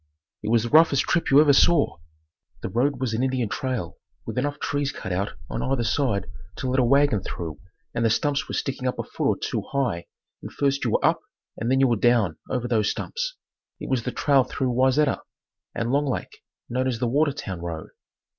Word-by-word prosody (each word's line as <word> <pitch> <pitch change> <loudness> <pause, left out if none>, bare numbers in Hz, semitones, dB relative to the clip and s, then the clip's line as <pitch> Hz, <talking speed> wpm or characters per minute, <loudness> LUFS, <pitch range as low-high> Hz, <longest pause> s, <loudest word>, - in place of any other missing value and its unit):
It 105 - -3
was 115 -1 +3
the 120 - -3
roughest 155 -2 +5
trip 170 - 0
you 140 - +7
ever 150 -2 +6
saw. 150 +2 +4 0.7
The - - -2
road 135 +5 +1
was 130 -4 -1
an 110 - 0
Indian 130 -3 0
trail 125 - -3 0.3
with 110 - -5
enough 145 +3 -1
trees 145 -1 -1
cut 95 - -6
out 100 +3 -1
on - - -4
either 130 -2 0
side 115 -3 0 0.3
to 130 - -4
let 130 +1 +1
a - - +4
wagon 140 -3 +3
through 80 -3 -6 0.3
and 120 - -1
the 115 - +4
stumps 140 +5 0
were - - -4
sticking 130 -1 -2
up 125 - -1
a - - -2
foot - - -2
or - - +2
two - - -2
high 125 -12 -1 0.3
and - - -8
first 140 -1 0
you - - +2
were - - +2
up - - +3 0.3
and 115 - -3
then 130 +1 +3
you 135 - +5
were 120 -2 +2
down 110 -7 +2
over 125 -2 -1
those 110 -4 +2
stumps. - - -3 0.4
It - - -6
was 130 -3 +2
the 125 - -3
trail 140 -1 +3
through 130 0 -2
Wayzata 130 +3 +2 0.5
and 115 +1 -1
Long 145 +1 +2
Lake, 130 - -4 0.3
known 130 +2 -1
as 125 -3 -1
the 125 - -1
Watertown 135 - 0
road. 85 -2 -5
130 Hz, 210 wpm, -25 LUFS, 115-140 Hz, 0.7 s, you